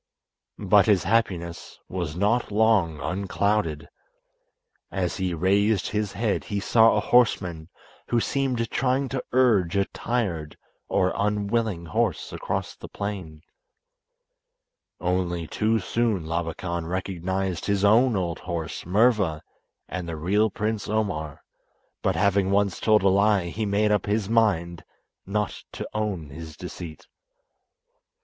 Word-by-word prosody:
But 100 Hz, -1 st, +4 dB
his 100 Hz, -4 st, +4 dB
happiness 90 Hz, -5 st, -1 dB
was 85 Hz, -4 st, -4 dB
not 105 Hz, +6 st, +1 dB
long 100 Hz, -7 st, +3 dB
unclouded. 95 Hz, -4 st, -1 dB, 1.0 s
As 90 Hz, -3 st, -2 dB
he 95 Hz, -3 st, -1 dB
raised 100 Hz, +4 st, +2 dB
his 105 Hz, -2 st, -2 dB
head 105 Hz, +1 st, -1 dB
he 105 Hz, -2 st, -2 dB
saw 115 Hz, +2 st, +5 dB
a -, -, +3 dB
horseman 90 Hz, -9 st, +2 dB, 0.4 s
who 120 Hz, -, +2 dB
seemed 125 Hz, -3 st, -1 dB
trying 135 Hz, +1 st, +1 dB
to 130 Hz, 0 st, -3 dB
urge 110 Hz, -9 st, +3 dB
a 100 Hz, -, +3 dB
tired 95 Hz, -14 st, -3 dB, 0.3 s
or 95 Hz, 0 st, +1 dB
unwilling 105 Hz, -2 st, 0 dB
horse 110 Hz, +1 st, -1 dB
across -, -, -3 dB
the -, -, -11 dB
plain. 95 Hz, -7 st, -6 dB, 1.6 s
Only 90 Hz, -1 st, -1 dB
too 110 Hz, +7 st, +1 dB
soon 110 Hz, -3 st, 0 dB
Labakan 85 Hz, +1 st, -3 dB
recognised 95 Hz, 0 st, -2 dB
his 100 Hz, -1 st, +2 dB
own 115 Hz, +3 st, +5 dB
old 85 Hz, -3 st, -2 dB
horse, 85 Hz, -3 st, -5 dB
Murva, 100 Hz, -4 st, +2 dB, 0.5 s
and 90 Hz, -2 st, -5 dB
the 80 Hz, -, -3 dB
real 100 Hz, +7 st, +2 dB
Prince 105 Hz, +1 st, -3 dB
Omar, 95 Hz, -9 st, -2 dB, 0.6 s
but 95 Hz, -, +1 dB
having 100 Hz, +1 st, +2 dB
once 100 Hz, -1 st, +1 dB
told 110 Hz, -2 st, +3 dB
a 100 Hz, -, +5 dB
lie 100 Hz, -2 st, +3 dB
he 110 Hz, +4 st, -3 dB
made 105 Hz, +1 st, +2 dB
up 105 Hz, -1 st, +1 dB
his 105 Hz, -1 st, 0 dB
mind 95 Hz, -7 st, +1 dB, 0.4 s
not 105 Hz, +1 st, -2 dB
to -, -, -5 dB
own 100 Hz, -9 st, -3 dB
his 80 Hz, +1 st, -9 dB
deceit. 90 Hz, -3 st, -8 dB
100 Hz, 130 wpm, -25 LUFS, 85-110 Hz, 1.6 s, saw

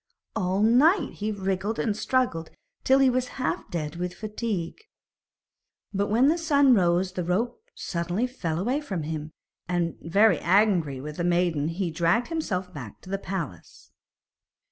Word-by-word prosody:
All 190 Hz, -1 st, +1 dB
night 290 Hz, -, +4 dB
he 210 Hz, +1 st, -2 dB
wriggled 195 Hz, +1 st, -2 dB
and 215 Hz, -3 st, 0 dB
struggled 215 Hz, -9 st, 0 dB, 0.3 s
till 265 Hz, -, +5 dB
he 270 Hz, -1 st, +5 dB
was 255 Hz, 0 st, 0 dB
half 255 Hz, -, -2 dB
dead 155 Hz, -2 st, -4 dB
with 180 Hz, 0 st, -3 dB
fatigue. 210 Hz, -5 st, -4 dB, 1.1 s
But 200 Hz, +1 st, 0 dB
when 235 Hz, +6 st, +4 dB
the 330 Hz, +3 st, +2 dB
sun 285 Hz, -5 st, +4 dB
rose 180 Hz, -2 st, +2 dB
the 180 Hz, -1 st, -3 dB
rope 205 Hz, -, -1 dB
suddenly 175 Hz, -, -2 dB
fell 175 Hz, -11 st, -3 dB
away 245 Hz, -, 0 dB
from 190 Hz, -, -4 dB
him, 155 Hz, 0 st, -5 dB, 0.4 s
and, 175 Hz, -2 st, -1 dB
very 205 Hz, +7 st, +4 dB
angry 175 Hz, -7 st, +2 dB
with 150 Hz, +3 st, -7 dB
the 175 Hz, -, -1 dB
maiden 175 Hz, -4 st, +1 dB
he 170 Hz, +1 st, -2 dB
dragged 175 Hz, -, +1 dB
himself 190 Hz, -, -3 dB
back 125 Hz, -, -8 dB
to 185 Hz, -, -11 dB
the 195 Hz, -, -1 dB
palace. 170 Hz, -, -6 dB
190 Hz, 155 wpm, -26 LUFS, 170-230 Hz, 1.1 s, till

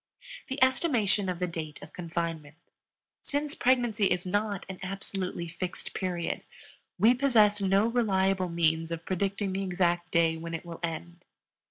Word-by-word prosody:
THE 265 Hz, -, -4 dB
ESTIMATION 235 Hz, -, +2 dB
OF 180 Hz, -, -2 dB
THE 180 Hz, -, 0 dB
DATE 160 Hz, -3 st, -5 dB
OF -, -, -12 dB
CONFINEMENT. 165 Hz, -3 st, -4 dB, 0.7 s
Since 290 Hz, +1 st, -2 dB
pregnancy 240 Hz, -7 st, +2 dB
is 180 Hz, 0 st, 0 dB
not 205 Hz, +1 st, -1 dB
an 190 Hz, -1 st, -7 dB
absolutely 190 Hz, -2 st, -4 dB
fixed 175 Hz, +2 st, -5 dB
period, 180 Hz, -3 st, -2 dB, 0.5 s
we 220 Hz, +6 st, +6 dB
possess 220 Hz, -6 st, +4 dB
no 195 Hz, +2 st, +3 dB
reliable 195 Hz, -5 st, +2 dB
means 165 Hz, -1 st, +1 dB
of 165 Hz, 0 st, -5 dB
predicting 195 Hz, +1 st, -1 dB
the 195 Hz, -, -1 dB
exact 175 Hz, -2 st, 0 dB
day 165 Hz, -1 st, +3 dB
when 165 Hz, +1 st, -5 dB
it 165 Hz, -, -6 dB
will 170 Hz, -1 st, -8 dB
end. 170 Hz, +1 st, -5 dB
185 Hz, 150 wpm, -29 LUFS, 170-205 Hz, 0.7 s, we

